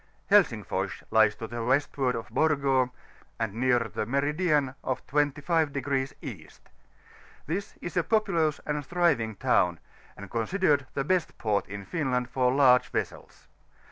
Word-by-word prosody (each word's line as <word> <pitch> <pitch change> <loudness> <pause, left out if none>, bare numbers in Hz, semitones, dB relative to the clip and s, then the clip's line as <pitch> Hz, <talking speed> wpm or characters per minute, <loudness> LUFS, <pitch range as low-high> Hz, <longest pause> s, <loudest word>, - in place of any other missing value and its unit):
HSXiSIH - - +3
or - - +1
O&S - - -9
lies 110 -1 +4
to 115 - -6
the 120 0 -5
westward 130 0 +1
of 115 - -5
Borgo, 140 -5 +2 0.5
and 115 -3 -2
near 125 +2 +2
the 110 -2 -4
meridian 145 +1 +1
of 130 - -3
25° 145 -2 0
East: - - -10 0.8
this 180 +6 -4
is 175 - -6
a 180 - +3
populous 170 -7 +1
and 150 0 -2
thriving 140 -9 +1
town, 90 -3 +2 0.4
and 100 -1 -10
considered 140 - +1
the 140 - 0
best 180 +2 0
port 105 -2 0
in 100 0 -7
Finland 130 - -1
for 125 -1 +2
large 130 -2 +5
vessels. - - -5
135 Hz, 140 wpm, -27 LUFS, 120-150 Hz, 0.8 s, large